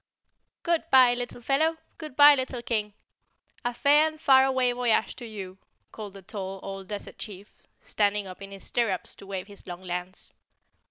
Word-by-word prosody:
"Goodbye, 315 -7 +4
Little 245 0 -5
Fellow! 315 +6 +1 0.2
Goodbye, 295 -1 +6
Little 260 -3 -3
King! 210 -3 -1 0.7
A 245 - 0
fair 290 +5 +4
and 310 0 -7
far 265 -3 +6
away 260 -2 +2
voyage 245 -3 +1
to 240 - -8
you," 195 -3 -8 0.3
called 210 -3 -8
the 195 -1 -12
tall 195 -1 -6
old 195 -1 -7
desert 205 0 -7
chief, 200 -2 -9 0.3
standing 205 -1 0
up 185 0 -10
in 195 - -8
his 195 -1 -10
stirrups 225 -6 -1
to 195 - -13
wave 190 -2 -4
his 200 -1 -14
long 175 0 -7
lance. 180 +1 -6
220 Hz, 165 wpm, -27 LUFS, 195-260 Hz, 0.7 s, Goodbye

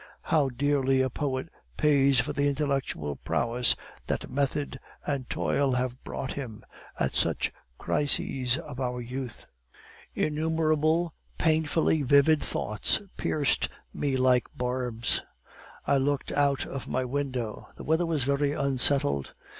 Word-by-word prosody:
How 145 -4 +2
dearly 135 0 +1
a 130 -1 0
poet 135 +1 -2 0.3
pays 140 -3 +4
for - - 0
the 145 0 +1
intellectual 135 - -1
prowess 120 +1 +2 0.3
that - - -3
method 140 0 -1 0.3
and 140 -3 -2
toil 125 - +1
have 125 0 -2
brought 130 - -4
him, 120 -7 -7 0.4
at - - 0
such - - 0 0.2
crises 135 -3 +1
of 150 -6 -8
our 125 -1 -2
youth! 125 0 -6 0.7
Innumerable 155 +1 +1 0.2
painfully 160 -1 +2
vivid 145 +3 +5
thoughts 105 0 0 0.2
pierced 150 -3 +1 0.2
me 135 -2 0
like 125 -1 +3
barbs. 125 -2 0 0.6
I 140 - +3
looked 140 +1 0
out 140 -1 +2
of 135 - -6
my 130 0 -1
window; 130 -4 -3
the - - -9
weather 160 +2 +1
was 155 -5 0
very 140 +2 +1
unsettled. 135 - +2
135 Hz, 125 wpm, -28 LUFS, 125-145 Hz, 0.7 s, vivid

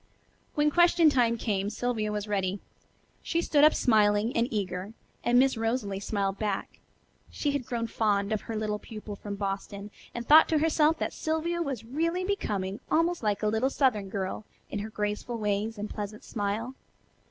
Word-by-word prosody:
When 295 0 +3
question 345 -1 +5
time 235 -3 +2
came 205 -3 -1
Sylvia 220 -1 -2
was 210 0 -3
ready. 195 -1 -1 0.6
She 335 - -1
stood 295 -3 +3
up 305 - +7
smiling 215 -1 +3
and 230 +1 +2
eager, 195 -1 -3 0.3
and 240 +1 +3
Miss 265 +1 +4
Rosalie 225 -3 -1
smiled 200 -1 -2
back. 205 -3 -3 0.5
She 290 - -1
had 280 -4 -3
grown 235 -2 -2
fond 210 -2 0
of 215 - -1
her 225 - -6
little 215 -1 -2
pupil 215 -2 -8
from 200 0 -6
Boston, 200 +1 -4 0.2
and 235 0 -5
thought 310 +2 +8
to 320 - +3
herself 315 0 +3
that - - -2
Sylvia 325 +2 -1
was 270 -8 -3
really 335 +8 -1
becoming 205 - -2
almost 335 +2 +2
like 210 -2 -1
a - - +3
little 220 +5 +1
southern 235 -9 +1
girl 190 +2 -3 0.3
in 205 - -2
her 210 +2 -5
graceful 210 +3 -3
ways 210 +1 -1
and 205 +1 -4
pleasant 210 0 -6
smile. 215 +4 -3
220 Hz, 175 wpm, -28 LUFS, 205-270 Hz, 0.6 s, thought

